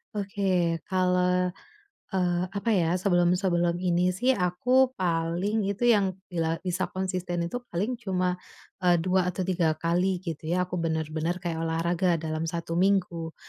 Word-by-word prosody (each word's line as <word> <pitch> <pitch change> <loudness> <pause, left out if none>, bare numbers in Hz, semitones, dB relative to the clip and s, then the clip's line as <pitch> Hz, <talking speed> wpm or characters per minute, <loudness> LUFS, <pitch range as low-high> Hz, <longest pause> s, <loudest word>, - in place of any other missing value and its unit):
Oke. 190 -4 0 0.2
Kalau, 180 0 +2 0.6
eee, 175 -2 +1 0.2
apa 215 +3 -1
ya, 175 -6 +2
sebelum-sebelum 175 -1 +2
ini 180 0 +2
sih 245 +8 0
aku 250 +9 +2
paling 180 +4 0
itu 205 +5 +1
yang 205 -4 +5 0.2
bila 165 -3 0
bisa 180 0 -1
konsisten 180 -2 -2
itu - - -3
paling 210 +8 -2
cuma, 180 -5 -1 0.4
eee, 175 -2 +3
2 185 +1 +2
atau 185 - -3
3 175 -3 +1
kali 175 +3 0
gitu 165 -4 -6
ya. 180 0 0
Aku 180 - -3
bener-bener 160 +1 -2
kayak 170 -3 -3
olahraga 170 +2 +1
dalam 155 0 -2
1 165 0 -3
minggu. 180 -4 +1
180 Hz, 140 wpm, -27 LUFS, 170-190 Hz, 0.6 s, yang